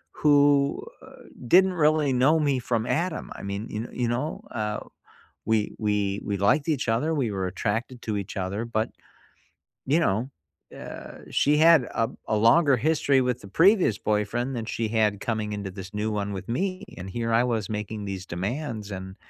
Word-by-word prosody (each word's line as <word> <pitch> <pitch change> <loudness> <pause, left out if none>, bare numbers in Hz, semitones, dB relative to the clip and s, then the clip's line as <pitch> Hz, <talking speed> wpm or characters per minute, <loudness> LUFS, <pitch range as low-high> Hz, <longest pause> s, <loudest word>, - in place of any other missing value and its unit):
who, 145 -1 +4 0.2
uh, - - -15 0.2
didn't 185 +7 +5
really 155 -4 +2
know 135 +6 +4
me 145 -3 +1
from 115 -2 -1
Adam. 165 +5 -2
I - - -9
mean, 100 +3 -4
you 110 +3 -4
you 120 - -1
know, 125 +6 -2
uh, 105 -1 -2 0.7
we 110 -1 +1
we 105 -2 0
we 100 -1 -1
liked 135 - +2
each 145 -7 0
other, 140 +9 +1
we 130 -8 0
were 95 -1 -2
attracted 115 +6 -3
to 110 -2 -2
each 100 -1 -5
other, 95 +4 -2
but 110 -1 -1 1.0
you 150 +5 +3
know, 120 -4 0 0.5
uh, - - -9
she 150 +1 +3
had 160 -3 +6
a 115 -1 -1 0.2
a 110 - +1
longer 135 +5 +5
history 140 +1 +2
with 125 -1 -1
the 100 - -11
previous 175 - +4
boyfriend 110 +5 -1
than 115 -2 -3
she 115 0 -2
had 105 -2 +1
coming 110 -1 -2
into 100 -2 -5
this 95 0 -9
new 105 +1 -1
one 100 -1 -2
with 95 0 -6
me, 185 +10 -2
and 95 +1 -7
here 115 +2 -2
I 115 - +4
was 115 -5 -1
making 105 0 -4
these 95 -2 -5
demands 105 - -4
and, 95 0 -7
115 Hz, 180 wpm, -26 LUFS, 105-140 Hz, 1.0 s, had